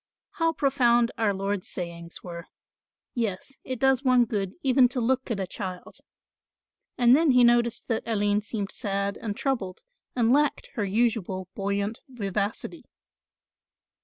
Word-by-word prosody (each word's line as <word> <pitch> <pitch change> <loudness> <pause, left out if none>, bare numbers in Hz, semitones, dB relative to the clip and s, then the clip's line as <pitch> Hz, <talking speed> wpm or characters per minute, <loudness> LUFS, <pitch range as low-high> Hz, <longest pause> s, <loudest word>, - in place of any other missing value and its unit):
"How 330 0 +3
profound 245 -5 +3
Our 220 -2 +3
Lord's 195 0 -2
sayings 170 -2 -6
were. 170 -1 -8 0.7
Yes, 225 +1 -3
it 255 - -4
does 265 0 +3
one 255 -2 +5
good 200 -4 -3
even 260 -1 +5
to 250 - -2
look 260 +2 0
at 225 -4 -1
a 190 - -1
child," 185 -1 -7 1.0
and 245 0 +6
then 320 +1 +3
he 250 0 +6
noticed 235 -1 +3
that 225 - 0
Aline 205 -2 +1
seemed 205 -1 -4
sad 200 0 -2
and 210 -3 -4
troubled 210 -10 -2 0.3
and 240 -1 +3
lacked 295 +1 +1
her 220 -7 -1
usual 195 -3 0
buoyant 200 +3 -2
vivacity. 205 -3 -3
225 Hz, 140 wpm, -26 LUFS, 195-245 Hz, 1.0 s, and